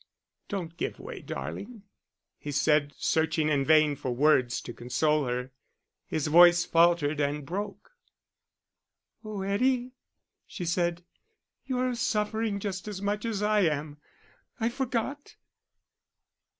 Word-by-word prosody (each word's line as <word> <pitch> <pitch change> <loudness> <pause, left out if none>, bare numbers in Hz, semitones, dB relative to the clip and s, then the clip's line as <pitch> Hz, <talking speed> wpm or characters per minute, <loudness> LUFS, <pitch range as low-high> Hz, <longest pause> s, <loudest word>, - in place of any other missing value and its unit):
"Don't 170 -4 -5
give - - -3
way, - - -8
darling," 230 -5 -7 0.6
he 145 - -6
said, 145 0 +2
searching 160 -1 +1
in 145 -2 +2
vain 155 0 +4
for 135 -2 -5
words 125 -1 +3
to 120 - -8
console 150 +4 0
her. 125 +1 -3 0.6
His 155 - -2
voice 175 +2 +6
faltered 165 -3 +3
and 145 0 -1
broke. 200 - -5 1.3
"Oh, 210 -3 -5
Eddie," 250 +5 +1 0.6
she 180 - -6
said, 175 0 0 0.6
"you're 255 -1 0
suffering 220 -2 -1
just 195 -1 -4
as 205 -3 -5
much 205 +2 -2
as 210 -3 -2
I 210 0 +3
am. 150 -4 0 0.6
I 225 0 +1
forgot.... 265 +3 -3
175 Hz, 120 wpm, -28 LUFS, 150-210 Hz, 1.3 s, voice